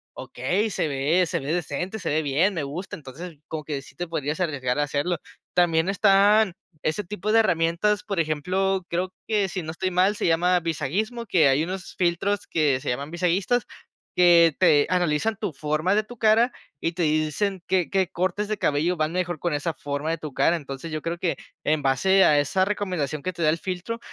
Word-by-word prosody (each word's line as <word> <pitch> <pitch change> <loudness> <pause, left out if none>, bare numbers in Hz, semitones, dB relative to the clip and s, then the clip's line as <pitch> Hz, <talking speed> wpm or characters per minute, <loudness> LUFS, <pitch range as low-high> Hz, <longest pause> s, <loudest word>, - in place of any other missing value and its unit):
"Okey, 185 - -1
se 165 - -1
ve 150 +6 +2
se 160 - -2
ve 140 +2 -4
decente, 175 +4 -3
se - - -3
ve 155 +2 +1
bien, 155 +8 +2
me 160 - -2
gusta". 155 +7 -5
Entonces 160 +4 -9
como 155 -1 -5
que 145 -2 -4
sí - - -16
te 175 - -4
podrías 150 0 -3
arriesgar 145 -7 -1
a - - +3
hacerlo. 145 +5 -1 0.4
También 165 -1 +3
están 200 0 +4 0.3
ese 155 +7 -1
tipo 210 +2 -3
de 225 - +5
herramientas, 185 +1 +1
por 200 -6 -3
ejemplo, 185 +5 0
creo 180 +2 -2
que 210 -3 +1
si 185 0 -4
no 160 - -7
estoy 185 +3 -2
mal 185 +3 +3
se - - -2
llama 175 +2 +3
Visagismo, 195 - -2
que 165 -7 +4
hay 135 +3 +2
unos 185 +2 -6
filtros 180 +3 0
que 150 -5 +1
se - - -4
llaman 140 +5 -3
visagistas 180 +7 +1 0.5
que 170 -3 +6
te 145 -1 +5
analizan 180 +4 +1
tu 165 - -3
forma 155 +6 0
de 215 - +2
tu 245 +3 -12
cara, 225 +3 +4 0.3
y 165 - -1
te 175 +1 -5
dicen 155 +5 0
qué 185 -3 +1
qué 190 -2 +1
cortes 185 +3 -1
de 215 0 -3
cabello 155 +5 +1
van 155 -1 -1
mejor 175 -3 -2
con 175 0 -1
esa 155 +3 -2
forma 145 +1 -3
de 165 - -2
tu 155 -1 -6
cara. 165 - +3
Entonces 140 +1 -7
yo 155 0 -3
creo 170 +2 -3
que 170 -1 -1 0.3
en 155 0 +1
base 145 +9 +3
a 150 -4 +5
esa 145 +7 +1
recomendación 180 -8 -2
que 185 - -2
te 170 - -7
da 155 - +4
el 160 - +1
filtro, 185 +6 -4
175 Hz, 205 wpm, -24 LUFS, 155-190 Hz, 0.5 s, que